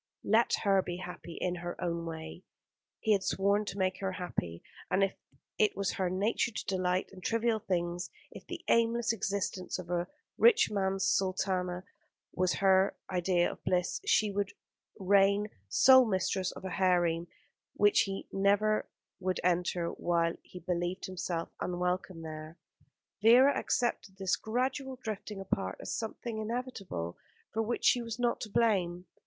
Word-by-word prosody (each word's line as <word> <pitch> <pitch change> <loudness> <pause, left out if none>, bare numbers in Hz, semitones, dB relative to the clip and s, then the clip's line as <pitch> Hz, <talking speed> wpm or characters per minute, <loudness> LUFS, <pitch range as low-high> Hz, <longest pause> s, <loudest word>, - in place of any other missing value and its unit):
Let 225 +3 +4
her 195 -2 +4
be 175 -1 -5
happy 180 -2 -8
in 180 0 -1
her 175 0 -6
own 170 -1 -2
way. 160 +1 -7 0.6
He 220 - +1
had 200 - +2
sworn 200 +2 +1
to 200 - -5
make 185 -1 0
her 195 -1 -2
happy: 85 - -4 0.3
and 195 - +3
if 195 - +1 0.5
it 215 - +3
was 200 -2 0
her 185 -2 -1
nature 200 +6 +1
to 225 - -5
delight 185 -1 0
in 185 - -11
trivial 230 +2 +1
things, 175 -3 -2 0.2
if - - -12
the - - -6
aimless 230 0 +3
existence 200 -3 -2
of 180 -1 -7
a 175 0 0 0.3
rich 455 - +6
man's 195 -1 0
sultana 185 -1 0 0.5
was 185 0 +1
her 190 0 +3
idea 180 -1 +2
of - - -13
bliss, 180 0 0
she 210 -2 +2
should 200 0 -1 0.4
reign 200 +2 +3 0.2
sole 260 - +7
mistress 190 -1 0
of - - -10
a 190 - -4
harem 175 -3 +2 0.5
which 205 0 +4
he 195 -1 -5
would 195 - -3
never 210 +2 +3 0.5
enter 175 -1 +1
while 170 -1 0
he - - -13
believed 175 +1 -2
himself 175 -2 -3
unwelcome 180 -1 -2
there. 155 +1 -8 0.6
Vera 250 +6 +7
accepted 200 -5 -1
this 190 0 +1
gradual 260 +5 -2
drifting 210 -1 -5
apart 100 - -2
as - - -5
something 225 0 -4
inevitable, 215 - -4 0.3
for 225 - +1
which 230 +2 -2
she 245 - +5
was 230 -2 -5
not 240 -1 0
to 215 - -5
blame. 185 -6 +1
190 Hz, 155 wpm, -31 LUFS, 180-215 Hz, 0.6 s, sole